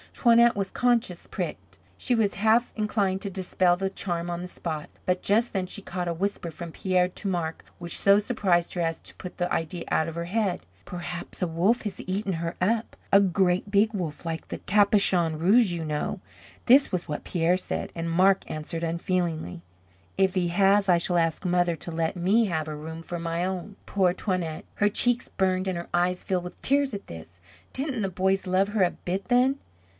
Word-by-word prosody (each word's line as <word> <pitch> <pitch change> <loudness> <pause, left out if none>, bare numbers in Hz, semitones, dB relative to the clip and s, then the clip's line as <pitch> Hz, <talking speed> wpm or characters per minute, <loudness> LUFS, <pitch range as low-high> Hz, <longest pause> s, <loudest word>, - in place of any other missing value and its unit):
Toinette 235 -1 +5
was 195 -1 -2
conscious 235 -8 0
pricked. - - -6 0.2
She 250 - 0
was 215 -3 +1
half 220 +4 +2
inclined 200 -3 0
to 200 - -3
dispel 185 -1 +1
the 195 +1 -1
charm 175 -3 -3
on 175 0 -3
the 180 - -5
spot. 160 -4 -5 0.2
But 180 0 0
just 225 +4 +2
then 190 -2 0
she 205 - -6
caught 180 -2 -4
a 170 - 0
whisper 180 -1 -2
from 170 +1 -8
Pierre 180 +1 +1
to 185 +3 -6
Marc 170 -4 -2
which 170 -1 -1
so 200 0 +6
surprised 200 -6 +1
her 175 - -2
as 165 -1 -1
to - - -12
put 180 - -9
the 175 0 -1
idea 165 +1 -2
out 160 - +1
of 165 - -6
her 170 0 -3
head. 190 -1 -1 0.2
"Perhaps 175 0 -7
a 180 - +1
wolf 180 +9 +1
has 210 -3 -4
eaten 195 +1 -1
her 170 0 -3
up 220 +5 0 0.2
a 200 - +8
great 190 0 +1
big 210 +2 +3
wolf 170 -7 -4
like 165 -1 -4
the - - -6
'Capuchon 195 -5 +3
Rouge,' 200 +4 +4
you 165 -2 -3
know." 150 -1 -2 0.5
This 270 +3 +6
was 180 -2 -2
what 150 - -4
Pierre 175 0 +1
said; 185 - -3
and 165 0 -3
Marc 185 +3 +4
answered 155 +2 -5
unfeelingly: 165 - -2 0.6
"If 190 -1 +3
he 180 -2 +1
has, 195 +2 +3
I 175 - +6
shall 175 +1 +1
ask 165 +2 0
mother 175 -1 +2
to 170 - -7
let 165 +2 -1
me 195 +6 +3
have 160 -5 -1
her 155 -1 -5
room 160 +2 -7
for 175 +1 -5
my 170 +1 -2
own." 190 +2 -4
Poor 185 -3 +2
Toinette, 180 -5 -3
her 205 - +3
cheeks 245 +3 +2
burned 185 0 0
and 185 -2 -1
her 170 - -6
eyes 180 +1 +1
filled 185 -2 -1
with 180 - -9
tears 280 -1 +2
at 200 - -6
this. 85 +2 -11 0.3
Didn't 265 -3 -2
the 195 - 0
boys 190 +1 0
love 190 +2 +2
her 205 -2 +2
a 175 - +2
bit 185 +2 -4
then? 255 +3 +3
185 Hz, 205 wpm, -26 LUFS, 170-200 Hz, 0.6 s, a